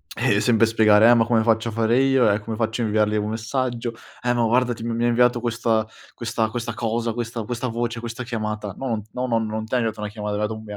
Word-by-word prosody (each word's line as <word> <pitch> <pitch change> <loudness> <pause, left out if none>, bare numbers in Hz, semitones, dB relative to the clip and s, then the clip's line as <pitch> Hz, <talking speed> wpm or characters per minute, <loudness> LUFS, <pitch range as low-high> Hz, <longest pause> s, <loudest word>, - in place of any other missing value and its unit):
Eh, 100 - +2
sempre 115 0 +4
spiegare: 110 -1 +5
"Eh, - - +8
ma 115 -1 +4
come 115 -1 +2
faccio 115 0 +1
a - - -6
fare 115 +2 +2
io? 135 -5 +4
E 105 - +1
come 110 +2 -5
faccio 110 +1 -1
a - - +1
inviargli 105 0 +1
un 105 0 -1
messaggio? 120 +1 -2 0.3
Eh, 120 - +2
ma 120 -1 +1
guarda 120 +1 +2
ti 115 - -9
m 115 - -2
mi 115 +1 -1
ha - - +3
inviato 120 +1 +3
questa 115 -2 0 0.3
questa 115 -1 -2
questa 120 0 -4
cosa, 115 0 -2
questa 115 -1 -4
questa 120 +3 -3
voce, 120 0 -3
questa 120 +1 -6
chiamata". 105 -4 -4
"No. 115 -5 -2
No, 125 0 -3
nonno 115 -3 0
non 110 0 -3
t'è 120 - -3
arrivata 110 -2 -1
una 105 - -3
chiamata, 105 -1 -4
è - - -2
arrivato 105 +1 -1
un 110 - -12
115 Hz, 250 wpm, -23 LUFS, 110-120 Hz, 0.3 s, Eh